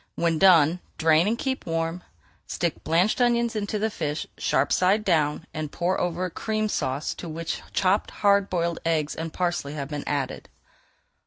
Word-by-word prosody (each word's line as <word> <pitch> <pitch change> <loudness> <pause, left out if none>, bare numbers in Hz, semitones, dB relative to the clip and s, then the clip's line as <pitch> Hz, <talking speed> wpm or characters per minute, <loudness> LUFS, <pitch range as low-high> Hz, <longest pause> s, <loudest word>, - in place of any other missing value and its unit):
When 165 -2 +1
done, 175 -3 +6 0.2
drain 160 +3 +4
and 225 +2 +1
keep 260 -4 -3
warm. 165 +1 -2 0.5
Stick 170 -2 -2
blanched 180 +9 +2
almonds 235 -1 +2
into 210 0 -2
the 220 +1 -1
fish, 150 -5 -3
sharp 135 +2 +1
side 195 +4 +3
down, 155 -3 +1
and 155 -2 -4
pour 180 +2 -1
over 180 +1 -1
a 180 - -5
Cream 215 +3 -2
Sauce 140 -5 -2
to 170 - -8
which 165 +1 -4
chopped 195 +2 +1
hard 200 -1 +2
boiled 170 -2 -1
eggs 155 -3 0
and 160 0 -5
parsley 175 -5 -2
have 140 -2 -5
been 150 -1 -4
added. 145 -2 -3
170 Hz, 170 wpm, -25 LUFS, 155-200 Hz, 0.5 s, done